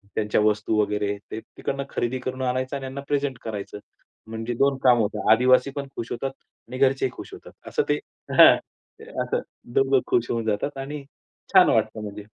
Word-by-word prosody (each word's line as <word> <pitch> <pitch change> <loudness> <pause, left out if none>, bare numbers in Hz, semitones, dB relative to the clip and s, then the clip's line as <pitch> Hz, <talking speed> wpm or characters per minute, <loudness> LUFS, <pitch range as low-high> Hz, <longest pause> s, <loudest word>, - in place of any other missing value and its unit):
त्यांच्या 105 0 +1
वस्तू 105 0 +1
वगैरे, 105 0 -1
ते 110 - -4
तिकडनं 140 +4 -5
खरेदी 125 +2 -2
करून 130 +1 -5
आणायचं, 130 +2 -1
आणि 135 - -8
त्यांना 135 +1 -5
प्रेझेंट 140 -3 -1
करायचं. 105 -2 -6 0.5
म्हणजे 115 +2 -4
दोन 140 +1 +2
कामं 120 -3 +6
होतात. 105 0 0
आदिवासी 130 +3 +4
पण 140 -1 -4
खुश 115 - -6
होतात, 135 +2 -3 0.4
आणि 130 +1 -7
घरचेही 135 -1 +2
खुश - - -10
होतात. - - -11 0.2
असं 450 - +1
ते - - +2 0.4
हां. - - +10 0.7
असं 480 - -1 0.3
दोघं 410 -1 +4
खुश 370 -2 +1
होऊन 115 -1 -1
जातात, 110 +7 -1
आणि 140 +1 -5 0.5
छान - - +7
वाटतं 110 0 +1
म्हणजे. 105 0 -7
125 Hz, 175 wpm, -24 LUFS, 110-140 Hz, 0.7 s, हां